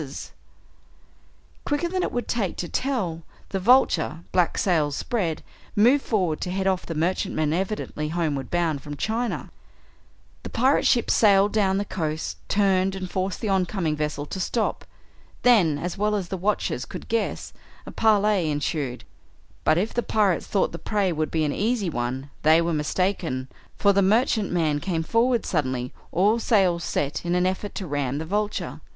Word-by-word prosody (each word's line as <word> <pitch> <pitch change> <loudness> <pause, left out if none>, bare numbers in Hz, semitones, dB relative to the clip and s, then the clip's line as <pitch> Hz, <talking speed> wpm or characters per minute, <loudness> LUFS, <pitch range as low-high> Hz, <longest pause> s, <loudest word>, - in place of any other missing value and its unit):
Quicker 290 +4 0
than 370 +1 -1
it - - -1
would 245 - -3
take 215 -6 -1
to 175 - -3
tell, 200 -10 -2 0.3
the 195 - -2
Vulture, 185 - +3
black 180 -2 +2
sails 155 -6 +1
spread, 180 - -2 0.3
moved 245 +7 +4
forward 185 -8 0
to 180 - -2
head 190 +1 -2
off 190 -1 0
the 165 - -4
merchantman 155 -2 0
evidently 185 -4 -2
homeward 155 -5 -2
bound 165 -5 0
from 145 0 -7
China. 230 +6 -2 0.9
The - - -7
pirate 260 +5 +2
ship 240 -3 +3
sailed 200 -1 +4
down 195 -3 +2
the 200 - -1
coast, 155 -5 -3
turned, 195 -1 +2
and 185 -1 -5
forced 190 0 -2
the 220 - -1
oncoming 185 -4 0
vessel 150 -1 -3
to 190 - -6
stop. 220 +5 -1 0.6
Then, 195 -12 +5
as 175 +5 -4
well 210 0 +2
as 190 -4 -3
the - - -2
watchers 190 -9 -1
could - - -9
guess, 230 0 -2 0.3
a - - -8
parley 210 -5 +3
ensued, 145 -3 -2 0.6
but 155 - +3
if 200 +5 -1
the 240 - +1
pirates 205 -6 +1
thought 195 - +1
the 170 - -7
prey 205 -4 0
would 155 -2 -1
be 160 -1 0
an 145 - -1
easy 215 -4 0
one 130 +2 -3
they 160 +2 +5
were 170 0 0
mistaken, 155 -4 -1 0.3
for 200 -1 +4
the 200 - +3
merchantman 190 - +2
came 165 +1 -2
forward 235 +6 +2
suddenly, 130 -6 -1 0.2
all 210 +6 +3
sails 185 -7 +2
set, 145 -1 -2
in 175 0 0
an 180 0 +2
effort 190 +2 -2
to 190 - -4
ram 145 -3 -2
the 160 - -4
Vulture. 210 +4 -2
185 Hz, 170 wpm, -24 LUFS, 155-210 Hz, 0.9 s, Then